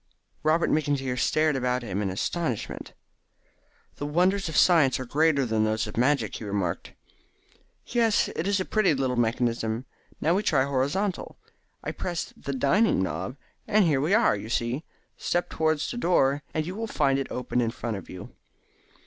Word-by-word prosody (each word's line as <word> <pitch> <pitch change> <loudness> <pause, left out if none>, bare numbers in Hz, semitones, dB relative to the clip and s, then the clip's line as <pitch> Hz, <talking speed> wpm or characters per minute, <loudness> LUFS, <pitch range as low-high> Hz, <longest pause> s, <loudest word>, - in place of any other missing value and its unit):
Robert 155 +2 +2
McIntyre 140 -4 0
stared 155 +2 +2
about 125 -1 0
him 100 -3 -3
in 100 - -1
astonishment. 125 - -3 1.0
"The 145 - -4
wonders 180 +4 +1
of 160 - -2
science 160 -8 +5
are 130 - -4
greater 145 +1 +2
than 110 -2 +1
those 110 +1 0
of 105 - -8
magic," 135 +5 +1
he - - -9
remarked. 100 -4 -3 0.9
"Yes, 230 -3 +2
it 170 - -2
is 200 -1 +2
a 185 - -1
pretty 215 -8 +2
little 130 -2 0
mechanism. 115 0 0 0.3
Now 165 - +2
we 195 - +2
try 140 -10 +2
the 140 - -4
horizontal. 160 +9 -1 0.5
I - - -3
press 175 -2 -4
the 140 - -6
'Dining' 140 - +2
knob 125 +7 -4 0.3
and 210 -2 +4
here 145 -5 +2
we 165 +8 +3
are, 225 - +4
you 105 +2 -7
see. 120 +5 -1 0.3
Step 175 0 -1
towards 155 -1 0
the 245 - -5
door, 145 - +2
and 155 -1 -1
you 180 - -5
will 225 +3 -4
find 140 -8 +1
it 135 - -3
open 125 0 -1
in 115 - +1
front 115 -1 -4
of 95 - -9
you." 90 - -9
140 Hz, 175 wpm, -26 LUFS, 120-170 Hz, 1.0 s, science